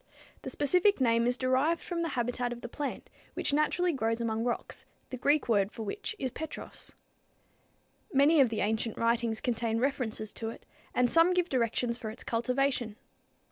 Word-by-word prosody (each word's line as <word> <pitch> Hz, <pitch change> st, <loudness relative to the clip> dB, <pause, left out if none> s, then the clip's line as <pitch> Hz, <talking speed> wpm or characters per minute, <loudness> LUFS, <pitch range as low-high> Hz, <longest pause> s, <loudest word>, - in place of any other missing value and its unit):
The -, -, -5 dB
specific 360 Hz, +7 st, +3 dB
name 230 Hz, -2 st, +3 dB
is 245 Hz, +1 st, +1 dB
derived 265 Hz, +6 st, +2 dB
from 345 Hz, -2 st, -4 dB
the 335 Hz, -, 0 dB
habitat 245 Hz, 0 st, -1 dB
of 240 Hz, 0 st, -6 dB
the -, -, -5 dB
plant, 280 Hz, +3 st, -5 dB, 0.2 s
which -, -, -1 dB
naturally 335 Hz, +4 st, +2 dB
grows 230 Hz, -3 st, 0 dB
among 225 Hz, -1 st, -1 dB
rocks, 240 Hz, -1 st, -3 dB, 0.3 s
the -, -, -3 dB
Greek 285 Hz, +4 st, +2 dB
word 205 Hz, -3 st, +2 dB
for 225 Hz, -, -6 dB
which 420 Hz, -, -4 dB
is 260 Hz, -7 st, -2 dB
petros. 315 Hz, +4 st, -7 dB, 1.2 s
Many 290 Hz, +1 st, +5 dB
of 255 Hz, -, +4 dB
the 220 Hz, -, -2 dB
ancient 220 Hz, +1 st, -1 dB
writings 230 Hz, -1 st, +1 dB
contain 230 Hz, -2 st, -1 dB
references 230 Hz, -4 st, -1 dB
to 225 Hz, -, -4 dB
it, -, -, -10 dB, 0.3 s
and 250 Hz, -1 st, +3 dB
some 335 Hz, +2 st, +5 dB
give 360 Hz, -1 st, +1 dB
directions 235 Hz, -1 st, 0 dB
for 220 Hz, -, -5 dB
its 220 Hz, -, -9 dB
cultivation. 245 Hz, -1 st, 0 dB
245 Hz, 175 wpm, -30 LUFS, 230-285 Hz, 1.2 s, Many